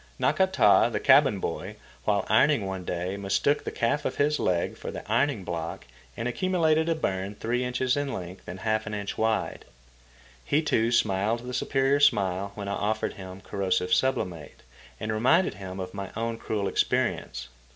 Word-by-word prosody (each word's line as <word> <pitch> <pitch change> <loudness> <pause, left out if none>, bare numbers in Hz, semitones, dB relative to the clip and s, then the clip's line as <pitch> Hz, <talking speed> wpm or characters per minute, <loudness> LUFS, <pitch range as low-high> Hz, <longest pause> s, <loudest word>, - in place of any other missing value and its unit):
Nakata, 190 - +4
the 105 - -1
cabin 135 -4 +5
boy, - - -4 0.3
while - - +1
ironing - - +4
one 95 -1 -4
day, 90 +2 -3
mistook 100 +9 +1
the - - -4
calf 130 +6 0
of - - -2
his 150 +1 +1
leg 85 -2 0
for - - -7
the - - -7
ironing 140 -8 +1
block 85 -2 -5 0.3
and 115 - -2
accumulated 160 +2 +1
a 165 - +2
burn 95 -8 -2
three 120 +4 -1
inches 125 0 0
in 145 -1 -2
length 90 -2 -7
and 95 +1 -7
half 110 0 0
an 105 - -3
inch 100 -1 -4
wide. 110 -1 -1 0.8
He, 150 - +1
too, 115 -6 +1
smiled 110 +1 +1
the 125 - -5
superior 135 +2 +1
smile 100 -8 +2
when 100 -1 -6
I 100 - -2
offered 110 +2 -1
him 95 0 -9
corrosive 95 -2 -1
sublimate 90 - -1 0.4
and 110 0 -2
reminded 130 +12 +3
him 95 -1 -8
of 90 -1 -5
my 100 -1 -5
own 115 0 -2
cruel 105 -2 -2
experience. 60 -8 -1
110 Hz, 170 wpm, -27 LUFS, 95-130 Hz, 0.8 s, cabin